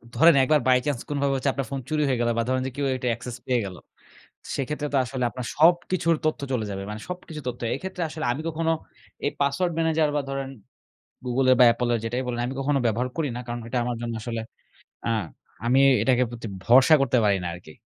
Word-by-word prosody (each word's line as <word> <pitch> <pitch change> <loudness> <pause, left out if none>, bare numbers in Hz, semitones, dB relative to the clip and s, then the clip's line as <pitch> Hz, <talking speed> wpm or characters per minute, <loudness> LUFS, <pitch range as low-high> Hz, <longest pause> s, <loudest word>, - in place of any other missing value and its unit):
ধরেন 165 -1 +7
একবার 150 +3 +4
by 130 -1 +6
chance 145 -5 -1
কোনোভাবে 140 -1 0
হচ্ছে 135 +1 0
আপনার 135 -3 -3
ফোন 135 - -2
চুরি 155 -1 0
হয়ে 130 -3 0
গেল 120 - +2
বা 115 - +2
ধরেন 130 0 +1
যে - - -5
কেউ 140 0 -1
এটার 125 -1 -2
অ্যাকসেস 120 +1 -5
পেয়ে 125 -1 +1
গেল। 95 -2 -7 0.8
সেইক্ষেত্রে 150 +2 -2
তো - - +2
আসলে 125 0 -3
আপনার 125 0 -6
সবকিছুর 170 +1 +3
তথ্য 155 - 0
চলে 120 -4 0
যাবে। 95 0 -4
মানে 105 0 -6
সবকিছু 175 -4 -7
তথ্য। 120 -1 -5
এইক্ষেত্রে 185 +5 -5
আসলে 155 0 -5
আমি 135 - -4
কখনো 165 0 0 0.5
এই - - +2
পাসওয়ার্ড 140 +6 +1
ম্যানেজার 160 -1 +2
বা - - +2
ধরেন 135 0 -3 0.8
গুগলের 130 +1 +3
বা - - +9
অ্যাপলের 120 0 +1
যেটাই 120 +3 -1
বলেন, 120 -1 -2
আমি 125 - -4
কখনো 140 +1 +1
ব্যবহার 120 +3 0
করি 155 -4 0
না। - - -4
কারণ, 120 0 -4
ঐটা 120 +2 -3
আমার 120 0 -2
জন্য 120 -1 -3
আসলে 115 0 -4 0.7
আ - - +1 0.6
আমি 130 +3 +4 0.2
এটাকে 125 -1 +3
প্রতি 120 -1 -7 0.2
ভরসা 130 +6 +7
করতে 130 -2 +2
পারি 100 -1 +4
না 90 - -3
আরকি। 85 -3 -12
130 Hz, 210 wpm, -25 LUFS, 120-150 Hz, 0.8 s, বা